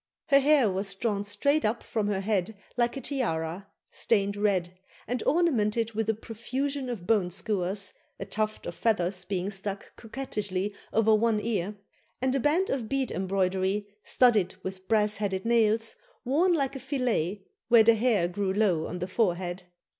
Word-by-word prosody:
Her 275 Hz, -1 st, +7 dB
hair 280 Hz, -3 st, +4 dB
was 195 Hz, 0 st, -1 dB
drawn 205 Hz, -1 st, -1 dB
straight 245 Hz, +10 st, +1 dB
up 220 Hz, +2 st, 0 dB
from 215 Hz, -3 st, -2 dB
her 200 Hz, -2 st, 0 dB
head 200 Hz, 0 st, -1 dB, 0.2 s
like 240 Hz, +1 st, +1 dB
a -, -, -4 dB
tiara, 190 Hz, -, -2 dB, 0.2 s
stained 200 Hz, -3 st, +1 dB
red, 190 Hz, -4 st, 0 dB, 0.3 s
and 245 Hz, -1 st, -2 dB
ornamented 230 Hz, -9 st, +2 dB
with 220 Hz, 0 st, -1 dB
a 220 Hz, -, +2 dB
profusion 255 Hz, +5 st, -4 dB
of 215 Hz, -8 st, -5 dB
bone 200 Hz, -3 st, +2 dB
skewers, 190 Hz, +1 st, -1 dB, 0.3 s
a 195 Hz, -, -4 dB
tuft 215 Hz, +2 st, -2 dB
of -, -, -4 dB
feathers 185 Hz, -5 st, 0 dB
being 195 Hz, 0 st, -2 dB
stuck 195 Hz, 0 st, -6 dB
coquettishly 210 Hz, -5 st, -3 dB, 0.2 s
over 220 Hz, 0 st, +4 dB
one 220 Hz, 0 st, +3 dB
ear, 210 Hz, -3 st, -2 dB, 0.4 s
and 260 Hz, 0 st, +1 dB
a 275 Hz, -, +1 dB
band 320 Hz, +8 st, +2 dB
of 240 Hz, -5 st, -2 dB
bead 270 Hz, -2 st, -1 dB
embroidery, 190 Hz, +1 st, 0 dB
studded 210 Hz, -8 st, +3 dB
with 190 Hz, 0 st, -6 dB
brass 210 Hz, -2 st, +2 dB
headed 195 Hz, -1 st, -2 dB
nails, 225 Hz, -1 st, +2 dB, 0.3 s
worn 315 Hz, +9 st, +3 dB
like 275 Hz, -4 st, 0 dB
a -, -, -4 dB
fillet 215 Hz, -, -1 dB, 0.2 s
where 230 Hz, -1 st, +7 dB
the 230 Hz, +1 st, +6 dB
hair 220 Hz, -6 st, +2 dB
grew 190 Hz, +2 st, -2 dB
low 190 Hz, -6 st, +1 dB
on 180 Hz, -, -5 dB
the 180 Hz, +1 st, -3 dB
forehead. 180 Hz, -3 st, -1 dB
210 Hz, 165 wpm, -28 LUFS, 190-235 Hz, 0.4 s, Her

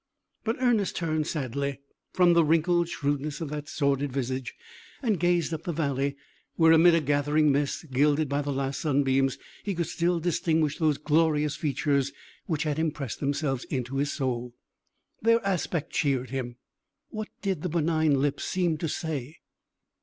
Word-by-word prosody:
But 225 Hz, +1 st, 0 dB
Ernest 235 Hz, -6 st, +2 dB
turned 155 Hz, -2 st, -1 dB
sadly 140 Hz, -2 st, -2 dB, 0.3 s
from 180 Hz, -2 st, +4 dB
the 170 Hz, -1 st, +5 dB
wrinkled 165 Hz, +2 st, +2 dB
shrewdness 145 Hz, -1 st, -2 dB
of 160 Hz, -, -4 dB
that 150 Hz, -1 st, -5 dB
sordid 140 Hz, -1 st, 0 dB
visage, 130 Hz, -1 st, -3 dB, 0.5 s
and 215 Hz, -7 st, +1 dB
gazed 175 Hz, -1 st, +1 dB
up 160 Hz, -, -3 dB
the 175 Hz, -, -3 dB
valley, 140 Hz, -3 st, -1 dB, 0.4 s
where, 160 Hz, -1 st, +5 dB
amid 165 Hz, +1 st, +7 dB
a 165 Hz, -, +2 dB
gathering 145 Hz, +1 st, +2 dB
mist, 140 Hz, +2 st, -1 dB
gilded 145 Hz, +3 st, +3 dB
by 140 Hz, +1 st, 0 dB
the 145 Hz, -, -4 dB
last 135 Hz, 0 st, -2 dB
sunbeams, 135 Hz, -3 st, +2 dB, 0.3 s
he 200 Hz, -2 st, -2 dB
could 170 Hz, 0 st, 0 dB
still 175 Hz, +1 st, 0 dB
distinguish 160 Hz, -3 st, 0 dB
those 155 Hz, -3 st, +2 dB
glorious 150 Hz, -1 st, +2 dB
features 140 Hz, -2 st, 0 dB, 0.4 s
which 155 Hz, -3 st, 0 dB
had 150 Hz, -1 st, -1 dB
impressed 150 Hz, -6 st, -2 dB
themselves 140 Hz, -2 st, -1 dB
into 130 Hz, 0 st, -3 dB
his 140 Hz, +1 st, 0 dB
soul. 125 Hz, -2 st, -3 dB, 0.7 s
Their 230 Hz, +1 st, +4 dB
aspect 175 Hz, -4 st, -1 dB
cheered 130 Hz, -4 st, 0 dB
him. 125 Hz, -3 st, -4 dB, 0.5 s
What 215 Hz, -1 st, -5 dB
did 190 Hz, -6 st, -1 dB
the 180 Hz, -, -2 dB
benign 160 Hz, -3 st, +2 dB
lips 140 Hz, 0 st, 0 dB
seem 175 Hz, -4 st, 0 dB
to 165 Hz, -, -2 dB
say? 155 Hz, -3 st, -4 dB
150 Hz, 160 wpm, -27 LUFS, 140-165 Hz, 0.7 s, amid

